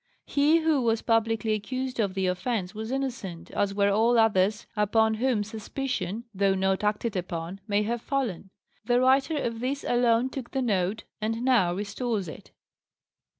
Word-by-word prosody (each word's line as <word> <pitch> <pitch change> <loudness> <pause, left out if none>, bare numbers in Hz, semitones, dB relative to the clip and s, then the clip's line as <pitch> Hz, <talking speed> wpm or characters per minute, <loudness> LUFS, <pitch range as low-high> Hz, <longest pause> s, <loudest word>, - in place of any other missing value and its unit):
He 300 +3 +3
who 315 -4 +2
was 225 -2 +1
publicly 225 -1 +1
accused 255 +4 -3
of 200 -3 0
the 190 -1 0
offence 185 +1 -1
was 220 +1 -5
innocent, 240 -11 -4
as 200 -1 0
were 200 0 +3
all 230 +4 +3
others 210 -1 +3
upon 220 +1 +3
whom 230 -1 +1
suspicion 220 0 -4
(though 195 0 +2
not 190 +1 0
acted 210 +1 0
upon) 180 +1 -4
may 205 0 +2
have 235 +2 -2
fallen. 235 -10 -2 0.3
The 245 0 +2
writer 270 +4 +3
of 230 -5 -2
this 265 +3 -2
alone 240 +1 +2
took 260 -3 -6
the 270 - -2
note, 200 -1 0 0.2
and 225 +2 -2
now 230 -10 +3
restores 210 0 -2
it." 155 - -10
220 Hz, 160 wpm, -27 LUFS, 200-250 Hz, 0.3 s, He